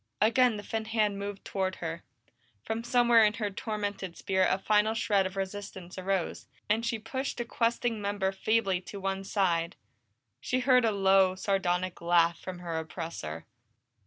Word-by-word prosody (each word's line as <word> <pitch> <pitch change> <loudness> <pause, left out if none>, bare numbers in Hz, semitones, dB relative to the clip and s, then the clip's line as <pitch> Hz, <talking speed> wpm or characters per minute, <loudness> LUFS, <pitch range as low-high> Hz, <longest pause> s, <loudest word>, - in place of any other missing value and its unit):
Again 230 +1 +4
the 205 - -7
thin 220 +1 -3
hand 215 -3 0
moved 200 0 -6
toward 190 -1 -1
her; 165 0 -5 0.6
from 225 +1 -3
somewhere 240 -1 +5
in 210 -1 +4
her 210 -2 -3
tormented 205 -3 -4
spirit 190 -1 +1
a 185 - +2
final 210 +2 +2
shred 200 -4 +2
of 185 - -10
resistance 190 -2 -5
arose, 190 -1 -2 0.2
and 220 +2 +1
she 230 -1 -1
pushed 260 +5 -4
the 240 - -2
questing 230 -1 0
member 200 -1 0
feebly 195 -2 +1
to 200 +2 -8
one 195 0 -2
side. 180 -4 0 0.6
She 255 0 -1
heard 250 -1 +4
a 225 - +3
low, 195 -2 +4
sardonic 185 -2 -1
laugh 170 0 +3
from 185 -1 -7
her 165 -2 -3
oppressor. 160 - -6
195 Hz, 160 wpm, -29 LUFS, 185-220 Hz, 0.6 s, somewhere